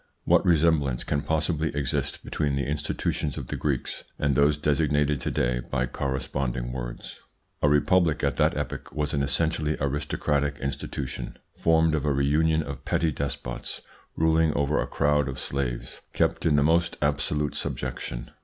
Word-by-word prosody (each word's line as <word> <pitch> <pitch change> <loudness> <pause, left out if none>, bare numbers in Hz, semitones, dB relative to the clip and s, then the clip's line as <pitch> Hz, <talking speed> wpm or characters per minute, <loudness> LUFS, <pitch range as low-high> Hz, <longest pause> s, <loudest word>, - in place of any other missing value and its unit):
What - - +5
resemblance 80 -7 +3
can 70 -1 -1
possibly 80 0 0
exist 70 -3 -1
between 70 -2 -1
the 70 - -1
institutions 75 0 -2
of - - -6
the - - -2
Greeks 70 -4 -2
and 70 -1 +1
those 70 +3 +4
designated 75 -1 +1
to - - -1
day 60 0 0
by 65 - +1
corresponding 65 -1 -2
words? - - -6 0.4
A 75 - +4
republic 80 +1 +3
at 70 - +1
that - - +2
epoch - - -4
was 75 -1 -1
an 70 - +1
essentially 75 +2 0
aristocratic 70 +1 0
institution, 70 0 -4 0.2
formed 80 -1 +3
of 75 -3 0
a 75 - +2
reunion 80 +3 +2
of 70 -2 -7
petty 80 +3 +1
despots 70 -3 -4 0.3
ruling 80 0 +3
over 70 +1 +1
a - - -2
crowd 75 -1 +2
of 65 - -5
slaves 65 -3 -3
kept - - +1
in 75 - +4
the 70 - +4
most 85 +2 +2
absolute 75 0 0
subjection. - - -4
75 Hz, 155 wpm, -26 LUFS, 70-75 Hz, 0.4 s, What